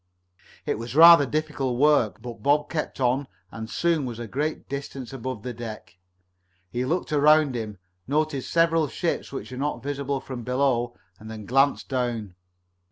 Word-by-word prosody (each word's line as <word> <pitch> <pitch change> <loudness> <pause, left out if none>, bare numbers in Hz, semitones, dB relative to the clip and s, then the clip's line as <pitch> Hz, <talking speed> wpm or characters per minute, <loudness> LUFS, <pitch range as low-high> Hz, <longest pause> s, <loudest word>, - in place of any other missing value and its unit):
It - - -1
was 115 +2 -6
rather 165 -2 +9
difficult 145 -4 -2
work, 135 -6 +3
but 120 -2 -8
Bob 145 +1 +2
kept 155 -4 -3
on 130 +2 +1 0.2
and 110 0 -7
soon 170 -1 +1
was 120 -2 -6
a 120 - -5
great 145 +8 -3
distance 135 -2 -6
above 130 -4 -5
the 125 - -4
deck. 110 -6 -9 0.7
He 125 +1 -1
looked 165 +2 -1
around 150 -1 +5
him, 110 -4 -5 0.3
noted 150 0 0
several 165 +1 +2
ships 170 +4 -3
which 135 - -6
were 125 - -7
not 145 +1 -2
visible 140 -1 -2
from 130 -2 -7
below 125 -1 0 0.2
and 110 - -10
then 110 -2 -8
glanced 135 +5 +2
down. 120 -7 -2
135 Hz, 165 wpm, -25 LUFS, 120-150 Hz, 0.7 s, rather